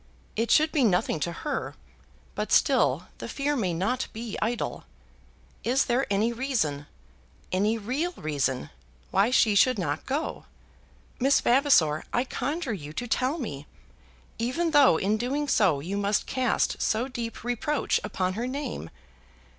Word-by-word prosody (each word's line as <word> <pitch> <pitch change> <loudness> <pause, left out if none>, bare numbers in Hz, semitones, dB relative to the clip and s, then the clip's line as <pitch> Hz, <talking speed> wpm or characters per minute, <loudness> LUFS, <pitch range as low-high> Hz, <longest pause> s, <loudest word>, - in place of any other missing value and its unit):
It 230 +1 0
should 310 +4 +4
be 295 -5 +2
nothing 180 -6 +2
to 170 - -1
her, 290 - -4 0.6
but - - -3
still - - +3
the - - -6
fear 290 +1 -1
may 200 -9 0
not 195 +10 -1
be 225 -1 -5
idle. 235 +1 -2 0.8
Is 255 +3 +2
there 250 +3 +1
any 210 +4 +1
reason, 220 - -1 0.6
any 210 +5 +1
real 260 +11 -2
reason, 140 - -2 0.4
why 200 +4 +3
she 230 -4 +4
should 255 +5 +4
not 150 -5 -3
go? 285 +4 -3 0.7
Miss 270 +2 +4
Vavasor, 240 - +3
I 245 - +1
conjure 275 +1 -3
you 150 -6 -7
to 245 +9 -4
tell 260 +6 0
me, 150 - -6 0.7
even 270 +9 0
though 285 - +6
in 205 +5 +1
doing 275 +6 -1
so 185 - +3
you 190 +7 -3
must 205 +1 +1
cast 255 -4 0
so 225 +4 +1
deep 235 -3 -6
reproach 245 +5 0
upon 185 -3 -1
her 235 +5 -3
name! 260 - -4
235 Hz, 145 wpm, -27 LUFS, 190-265 Hz, 0.8 s, though